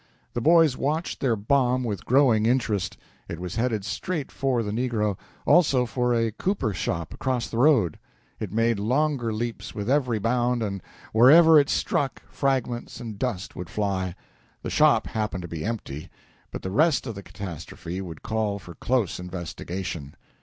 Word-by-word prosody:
The 120 Hz, -, -2 dB
boys 160 Hz, -1 st, +5 dB
watched 155 Hz, +6 st, -2 dB
their 125 Hz, -4 st, +2 dB
bomb 125 Hz, +4 st, +2 dB
with 105 Hz, -6 st, -4 dB
growing 120 Hz, -5 st, +4 dB
interest. 115 Hz, -6 st, 0 dB, 0.3 s
It 85 Hz, -, -5 dB
was 90 Hz, -1 st, -5 dB
headed 115 Hz, -4 st, 0 dB
straight 155 Hz, +5 st, -3 dB
for 130 Hz, -3 st, 0 dB
the 105 Hz, -, -3 dB
negro, 110 Hz, -3 st, 0 dB, 0.3 s
also 140 Hz, -8 st, +4 dB
for 125 Hz, 0 st, 0 dB
a 115 Hz, -1 st, +1 dB
cooper 130 Hz, -, -1 dB
shop 85 Hz, -3 st, -3 dB
across 130 Hz, -3 st, -1 dB
the 115 Hz, -, -4 dB
road. 125 Hz, -, +4 dB, 0.4 s
It 105 Hz, -5 st, -4 dB
made 115 Hz, 0 st, +1 dB
longer 130 Hz, +2 st, +1 dB
leaps 115 Hz, +2 st, -4 dB
with 105 Hz, 0 st, -4 dB
every 130 Hz, -5 st, +2 dB
bound, 120 Hz, +2 st, +1 dB
and, 100 Hz, -3 st, -3 dB, 0.3 s
wherever 155 Hz, +8 st, +8 dB
it 140 Hz, -, +2 dB
struck, 140 Hz, -3 st, -1 dB
fragments 130 Hz, -4 st, -1 dB
and 110 Hz, -4 st, -7 dB
dust 115 Hz, -8 st, -3 dB
would 90 Hz, -1 st, -6 dB
fly. 95 Hz, -4 st, -1 dB, 0.5 s
The -, -, -4 dB
shop -, -, +4 dB
happened 105 Hz, -4 st, -3 dB
to -, -, -5 dB
be 80 Hz, -2 st, -5 dB
empty, 100 Hz, -10 st, -5 dB, 0.4 s
but -, -, -7 dB
the 95 Hz, -, -3 dB
rest 150 Hz, -, +3 dB
of 115 Hz, -, -4 dB
the 100 Hz, -, -8 dB
catastrophe 90 Hz, -1 st, -7 dB
would 85 Hz, -5 st, -8 dB
call 110 Hz, -2 st, -1 dB
for 90 Hz, -3 st, -11 dB
close 115 Hz, -3 st, 0 dB
investigation. 90 Hz, -3 st, -6 dB
115 Hz, 165 wpm, -25 LUFS, 100-130 Hz, 0.5 s, wherever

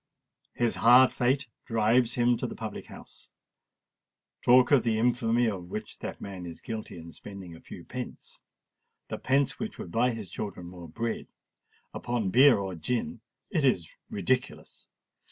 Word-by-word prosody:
His 120 Hz, -1 st, +1 dB
hard 125 Hz, +3 st, +7 dB
fate 130 Hz, +3 st, +1 dB, 0.2 s
drives 115 Hz, +2 st, +2 dB
him 120 Hz, 0 st, +3 dB
to -, -, -2 dB
the -, -, -7 dB
public -, -, -6 dB
house:—talk 125 Hz, +2 st, -2 dB
of 140 Hz, -4 st, +6 dB
the 115 Hz, -2 st, +1 dB
infamy 120 Hz, 0 st, +2 dB
of 95 Hz, -6 st, -3 dB
which 105 Hz, +2 st, -6 dB
that -, -, -6 dB
man 95 Hz, -3 st, -7 dB
is 85 Hz, -, -8 dB
guilty 110 Hz, -5 st, -6 dB
in 85 Hz, 0 st, -10 dB
spending 95 Hz, -2 st, -9 dB
a -, -, -14 dB
few -, -, -10 dB
pence—the -, -, -10 dB
pence 135 Hz, +1 st, +1 dB
which 220 Hz, -, -4 dB
would 85 Hz, -, -7 dB
buy 120 Hz, +5 st, +3 dB
his 110 Hz, -7 st, -6 dB
children 100 Hz, -4 st, -5 dB
more 85 Hz, -1 st, -10 dB
bread—upon 115 Hz, +1 st, -5 dB
beer 130 Hz, +2 st, +7 dB
or 95 Hz, -2 st, -3 dB
gin,—it 125 Hz, -, -3 dB
is 90 Hz, -, +2 dB, 0.2 s
ridiculous! -, -, -2 dB
115 Hz, 140 wpm, -28 LUFS, 95-125 Hz, 0.2 s, hard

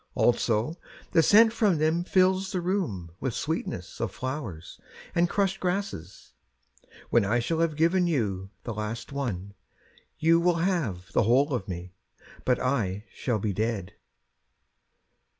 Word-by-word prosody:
Also 120 Hz, +5 st, +2 dB, 0.3 s
the 165 Hz, -, +5 dB
scent 220 Hz, +7 st, +6 dB
from 215 Hz, -7 st, +2 dB
them 160 Hz, +3 st, +1 dB
fills 190 Hz, +1 st, +2 dB
the 185 Hz, -, -1 dB
room 170 Hz, -, -2 dB
With 130 Hz, -4 st, -2 dB
sweetness 120 Hz, -, -3 dB
of 115 Hz, -5 st, -1 dB
flowers 120 Hz, -, -6 dB, 0.3 s
and 170 Hz, 0 st, +2 dB
crushed 195 Hz, -1 st, 0 dB
grasses. 180 Hz, -, -4 dB, 0.8 s
When 120 Hz, -, +5 dB
I 105 Hz, +5 st, +1 dB
shall 160 Hz, +8 st, -1 dB
have 165 Hz, -2 st, +1 dB
given 170 Hz, +3 st, +3 dB
you 100 Hz, -, -1 dB
the 115 Hz, -, -4 dB
last 105 Hz, +4 st, -5 dB
one, 100 Hz, -9 st, -3 dB, 0.6 s
You 165 Hz, +1 st, +4 dB
will 175 Hz, 0 st, +3 dB
have 165 Hz, -, -1 dB
the -, -, +4 dB
whole 135 Hz, +6 st, +3 dB
of 110 Hz, -7 st, -2 dB
me, 90 Hz, -1 st, -6 dB, 0.5 s
But 125 Hz, -, +2 dB
I 105 Hz, -6 st, -1 dB
shall 120 Hz, -4 st, -1 dB
be 105 Hz, -1 st, -1 dB
dead. 110 Hz, -3 st, -2 dB
130 Hz, 140 wpm, -27 LUFS, 105-175 Hz, 0.8 s, scent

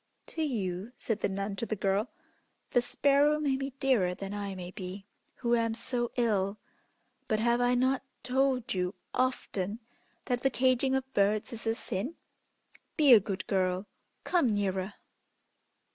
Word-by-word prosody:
"To 325 Hz, -, -5 dB
you," 210 Hz, -, -2 dB
said 225 Hz, -2 st, -2 dB
the -, -, 0 dB
nun 200 Hz, +1 st, -3 dB
to 230 Hz, -, -2 dB
the 215 Hz, -, -1 dB
girl, 200 Hz, +3 st, 0 dB, 0.6 s
"the 245 Hz, -, +4 dB
sparrow 285 Hz, +4 st, +3 dB
may 285 Hz, -3 st, +1 dB
be 270 Hz, +1 st, -3 dB
dearer 210 Hz, -10 st, +2 dB
than 195 Hz, +1 st, -6 dB
I 200 Hz, -1 st, -4 dB
may 180 Hz, -1 st, -7 dB
be, 190 Hz, +1 st, -7 dB, 0.3 s
who 240 Hz, -1 st, 0 dB
am 230 Hz, -1 st, +1 dB
so 240 Hz, +1 st, -1 dB
ill; 210 Hz, -4 st, +1 dB, 0.7 s
but 215 Hz, -, +1 dB
have 235 Hz, +2 st, +2 dB
I 245 Hz, 0 st, +3 dB
not 260 Hz, +1 st, +2 dB, 0.2 s
told 260 Hz, -1 st, +1 dB
you 180 Hz, +1 st, -1 dB, 0.2 s
often 225 Hz, -5 st, -1 dB, 0.5 s
that 245 Hz, -1 st, 0 dB
the 270 Hz, -, +3 dB
caging 260 Hz, +1 st, +2 dB
of 265 Hz, 0 st, -3 dB
birds 205 Hz, +3 st, +2 dB
is 225 Hz, 0 st, -7 dB
a 225 Hz, -, +2 dB
sin? 235 Hz, -, -4 dB, 0.8 s
Be 295 Hz, -5 st, +7 dB
a 225 Hz, -, +10 dB
good 195 Hz, -1 st, -4 dB
girl; 185 Hz, 0 st, 0 dB, 0.4 s
come 345 Hz, -7 st, +2 dB
nearer!" 195 Hz, -1 st, -1 dB
225 Hz, 160 wpm, -30 LUFS, 195-255 Hz, 0.8 s, a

